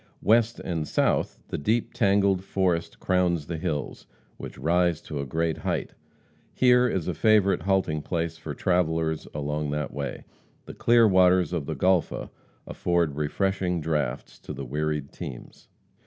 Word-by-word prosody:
West 115 +2 +3
and 80 -4 -3
south - - +1
the - - -3
deep, 110 +10 0
tangled 100 -1 +2
forest 90 -4 -1
crowns 90 -4 +1
the 85 +2 -4
hills, 75 -6 -4 0.3
which - - -9
rise 85 0 +1
to 75 - -6
a 70 - -4
great 80 +3 -1
height. - - -2 0.6
Here 125 0 +5
is 95 -7 -2
a 90 - 0
favorite 105 0 +3
halting 90 -4 0
place 85 0 -2
for 80 -3 -7
travelers 80 -3 0
along 75 0 -3
that 75 0 -3
way. 70 0 -5 0.4
The - - -9
clear 120 -1 +4
waters 90 -2 +4
of 80 -5 -2
the 80 - -3
Golpha 90 +3 +1 0.3
afford 85 -5 0
refreshing 90 +4 -1
draughts 75 -5 -3
to - - -8
the 70 - -6
wearied 75 +1 -2
teams. - - -9
85 Hz, 150 wpm, -26 LUFS, 75-95 Hz, 0.6 s, Here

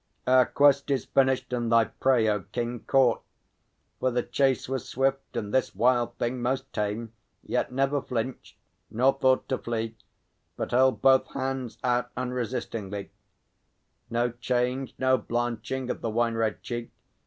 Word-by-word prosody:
Our 130 0 +5
quest 140 -1 +4
is 135 -2 0
finished, 130 -2 +1
and 120 -2 -1
thy 115 -1 +5
prey, 125 -3 +2
O 105 -1 +1
King, 120 +5 -4
Caught; 130 -4 +4 0.8
for 130 - +2
the 125 -1 0
chase 135 -2 +1
was 130 -2 -4
swift, 135 -1 -1
and 105 -3 -4
this 130 - +1
wild 120 0 +2
thing 120 +1 -2
Most 130 +2 -2
tame; 105 +2 -3 0.3
yet - - -1
never 135 +2 +1
flinched, 125 0 -4 0.3
nor 125 +5 +3
thought 130 -1 +2
to 130 - 0
flee, 115 -1 -3 0.6
But - - -3
held 130 +2 +3
both 130 -1 +5
hands 130 -4 -3
out 125 0 +1
unresistingly 115 -5 -4 1.0
No 120 +1 0
change, 125 +2 -1
no 130 -1 +3
blanching 120 +3 -2
of - - -6
the 115 - -2
wine 115 +1 +1
red 115 -2 -1
cheek. 120 -1 -4
125 Hz, 150 wpm, -27 LUFS, 115-130 Hz, 1.0 s, Our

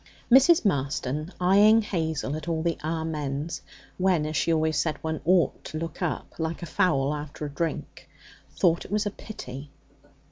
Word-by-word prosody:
Mrs. 270 +4 +6
Marston, 145 -1 -1
eyeing 205 +5 +5
Hazel 160 -7 -2
at 155 +1 -7
all 160 -1 -1
the 170 -1 +1
'Amens,' 155 -1 -3 0.4
when, 180 -4 +2
as 155 +1 -3
she 165 - +1
always 160 -1 +1
said, 155 -2 0
one 160 -1 -2
ought 175 -4 +2
to 155 - -5
look 165 +2 -5
up, 175 -3 -3
like 160 +1 -2
fowls 155 -6 +1
after 150 0 -6
a - - -4
drink, 160 +2 -4 0.5
thought 170 -2 +3
it - - -12
was 210 +2 0
a 205 - -1
pity. 140 - -9
160 Hz, 165 wpm, -26 LUFS, 150-180 Hz, 0.5 s, Mrs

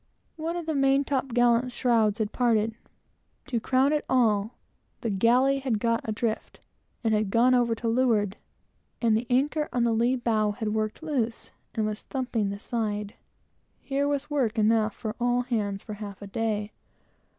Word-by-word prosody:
One 330 +1 -3
of 345 - -4
the 315 - -1
main 275 0 +3
top 275 -1 -1
gallant 245 0 +2
shrouds 230 -4 +2
had 215 -2 -1
parted; 225 -3 +2
and, - - -23 0.7
to 250 -5 -1
crown 265 +5 +2 0.2
all, 220 -3 +2 0.5
the 230 - -1
galley 250 +7 +3
had 260 -5 0
got 230 +1 +1
adrift, 220 0 -3 0.4
and 215 -2 +1
gone 240 +5 +4
over 240 -2 +3
to 230 - -4
leeward, 225 -4 +2 0.6
and 230 -2 +3
the 230 +2 -1
anchor 295 +4 +1
on 245 - +1
the 235 -1 +2
lee 235 +3 +2
bow 220 -4 +1
had 215 -1 -3
worked 215 +6 -2
loose, 245 -8 -2 0.2
and 220 - 0
was 215 0 -3
thumping 245 -6 -2
the 200 - -4
side. 210 -1 -3 0.7
Here 280 +1 -1
was 285 0 -1
work 265 -7 0
enough 215 0 +2
for 220 -2 -5
all 245 0 +2
hands 210 -5 -2
for 215 - -7
half 205 -1 -8
a - - -6
day. 210 0 -2
230 Hz, 170 wpm, -27 LUFS, 215-255 Hz, 0.7 s, gone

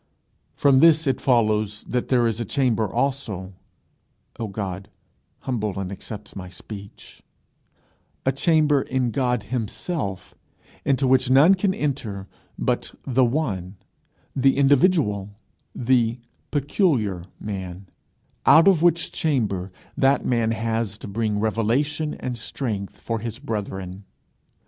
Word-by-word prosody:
From 140 -2 +4
this 160 +1 +6
it 135 -3 0
follows 110 -4 +1
that 125 -1 -2
there 125 -2 +3
is 115 0 0
a - - 0
chamber 115 -6 0
also 115 -8 -2 0.9
(O 115 - -2
God, 95 -2 -5 0.5
humble 110 -7 -2
and 95 -1 -4
accept 105 +1 -8
my 95 -2 -7
speech) 100 +2 -11 1.0
a 135 - +4
chamber 150 0 +3
in 130 -3 -1
God 125 -3 0
himself, 110 - -3 0.5
into 135 0 +2
which 130 -1 +3
none 140 +8 +7
can 190 0 +1
enter 120 - -3 0.3
but - - -1
the 130 0 +3
one, 105 - -1 0.6
the 135 0 +3
individual, 135 - +3 0.4
the 120 -1 +2 0.3
peculiar 135 - +1 0.2
man, 95 -2 -6 0.6
out 165 +4 +8
of 185 -5 +5
which 170 -1 +3
chamber 105 - -1 0.2
that 135 +1 +3
man 115 -2 +1
has 115 -2 -1
to - - -9
bring 105 0 -1
revelation 125 +8 0
and 125 -2 -5
strength 105 -5 -4
for 115 -1 -3
his 115 0 -5
brethren. 100 -7 -5
115 Hz, 120 wpm, -23 LUFS, 105-135 Hz, 1.0 s, out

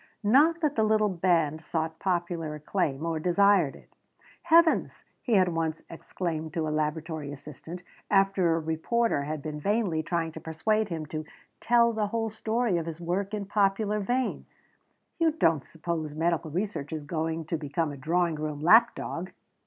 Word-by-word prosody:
Not 300 +10 +4
that 300 -2 +1
the 220 - +2
little 215 -1 +3
band 165 -4 +1
sought 160 0 -3
popular 175 -4 -2
acclaim, 150 -2 -2
or 165 -1 -1
desired 180 -2 +3
it. - - -18 0.5
"Heavens!" 335 0 +3 0.2
he 240 - -1
had 185 -2 +4
once 165 -1 -2
exclaimed 160 -2 -4
to 160 -2 0
a 155 - -2
laboratory 155 -1 -2
assistant, 150 +5 -9 0.3
after 195 -4 +3
a - - 0
reporter 160 +2 0
had 150 -1 -4
been 150 0 -5
vainly 195 -2 0
trying 165 0 -2
to 160 - -9
persuade 215 +8 0
him 160 -3 -4
to 155 +1 -5 0.4
"tell 235 -1 +4
the 215 -1 0
whole 225 +1 -2
story 220 -2 0
of 165 - -5
his 165 0 -6
work 185 +4 -2
in 205 -1 -4
popular 205 +1 +1
vein," 245 +5 -1 0.7
"you 325 -2 +3
don't 160 - +1
suppose 160 -2 -4
medical 165 0 0
research 175 -3 -3
is 155 -2 -4
going 160 +1 -3
to 165 - -2
become 150 +1 -2
a - - -7
drawing 170 +5 +1
room 150 -1 -4
lap 225 +10 +6
dog!" 180 +2 -5
170 Hz, 170 wpm, -28 LUFS, 155-205 Hz, 0.7 s, lap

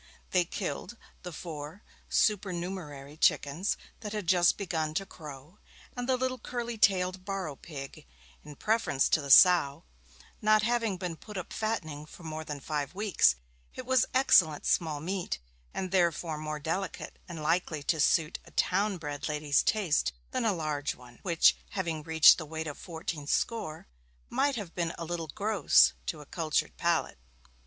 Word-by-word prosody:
They 180 -2 +3
killed 205 +6 -5 0.2
the 180 - -7
four 160 +3 -8 0.3
supernumerary 175 -8 -1
chickens 155 +6 +2 0.2
that 210 -2 -6
had 210 -3 -3
just 175 0 +4
begun 160 -5 -2
to 195 - -1
crow, 150 +1 -11 0.4
and 245 0 -4
the 260 - +3
little 255 0 -2
curly 240 -1 -4
tailed 185 -3 +2
barrow 190 -6 -4
pig, 135 - -9 0.4
in 150 -1 -11
preference 215 -8 +1
to 155 - +3
the 140 - -7
sow; 160 -1 +7 0.6
not 215 0 +4
having 230 -4 +1
been 175 -3 -4
put 210 +3 -9
up 180 - -6
fattening 155 -9 -3
for 175 - -13
more 160 -1 -5
than 150 -2 -6
five 145 +3 -3
weeks 205 - +3 0.4
it 255 - -7
was 260 -1 +3
excellent 180 - +4
small 155 -3 +1
meat, 185 +2 -3 0.3
and 185 -1 -4
therefore 170 -3 +1
more 155 0 -4
delicate 170 +6 -4
and 165 -3 -7
likely 160 -2 0
to 165 0 0
suit 155 +2 +2
a - - -16
town 195 +1 +1
bred 145 -2 -5
lady's 150 -1 +2
taste 180 - +1 0.2
than - - -1
the 225 - +2
large 155 -5 -2
one, 120 -1 -16
which, 170 -3 +4 0.2
having 165 -4 -2
reached 160 +2 +6
the 160 - -5
weight 160 +1 -4
of 145 -2 -5
fourteen 160 -3 -6
score, 160 -5 -1 0.5
might 285 -1 +1
have 205 -7 -6
been 170 -2 -2
a 165 - -5
little 165 -1 -4
gross 200 +2 +4
to 155 - -3
a - - -12
cultured 155 0 -1
palate. 170 - 0
170 Hz, 165 wpm, -30 LUFS, 155-195 Hz, 0.6 s, sow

